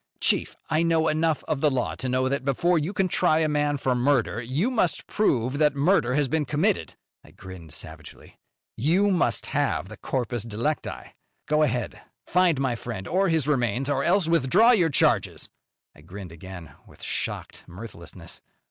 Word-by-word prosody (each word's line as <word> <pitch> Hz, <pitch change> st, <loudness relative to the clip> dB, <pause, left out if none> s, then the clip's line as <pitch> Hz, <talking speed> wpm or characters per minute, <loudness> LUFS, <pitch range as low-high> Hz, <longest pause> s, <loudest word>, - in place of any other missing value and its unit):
"Chief, -, -, +2 dB
I 155 Hz, 0 st, +1 dB
know 165 Hz, -1 st, +2 dB
enough 155 Hz, 0 st, +1 dB
of 155 Hz, -4 st, -1 dB
the 150 Hz, -, +4 dB
law 130 Hz, -3 st, -1 dB
to 130 Hz, -, -3 dB
know 130 Hz, +1 st, +1 dB
that, 140 Hz, 0 st, -1 dB
before 165 Hz, +6 st, +2 dB
you 155 Hz, +5 st, -2 dB
can 195 Hz, -2 st, 0 dB
try 155 Hz, -2 st, +2 dB
a 160 Hz, -1 st, +2 dB
man 145 Hz, -1 st, 0 dB
for 130 Hz, -1 st, 0 dB
murder, 125 Hz, -3 st, +1 dB
you 140 Hz, -, -1 dB
must 200 Hz, -9 st, 0 dB
prove 135 Hz, -, 0 dB
that 150 Hz, -1 st, +3 dB
murder 140 Hz, -4 st, +2 dB
has 145 Hz, -1 st, +2 dB
been 155 Hz, +3 st, 0 dB
committed." 165 Hz, +8 st, 0 dB, 0.3 s
I -, -, -17 dB
grinned 90 Hz, -4 st, -12 dB
savagely. 80 Hz, -1 st, -11 dB, 0.4 s
"You 180 Hz, -, +2 dB
must 180 Hz, -5 st, +1 dB
have 95 Hz, -, 0 dB
the 110 Hz, -, -10 dB
corpus 120 Hz, -3 st, -3 dB
delicti. 115 Hz, +8 st, -4 dB, 0.3 s
Go 150 Hz, 0 st, +2 dB
ahead! 125 Hz, -5 st, -1 dB, 0.2 s
Find 180 Hz, -5 st, +2 dB
my 130 Hz, -3 st, 0 dB
friend 115 Hz, -5 st, -6 dB
or 190 Hz, +2 st, +1 dB
his 160 Hz, -4 st, +1 dB
remains, 130 Hz, -1 st, 0 dB
or 140 Hz, -1 st, 0 dB
else 180 Hz, -1 st, +3 dB
withdraw 170 Hz, -, +4 dB
your 180 Hz, -9 st, +3 dB
charges." 140 Hz, -, +1 dB, 0.5 s
I -, -, -17 dB
grinned 90 Hz, +2 st, -10 dB
again, 85 Hz, -2 st, -10 dB, 0.2 s
with -, -, -16 dB
shocked -, -, -4 dB
mirthlessness. 90 Hz, -3 st, -9 dB
140 Hz, 175 wpm, -25 LUFS, 115-160 Hz, 0.5 s, the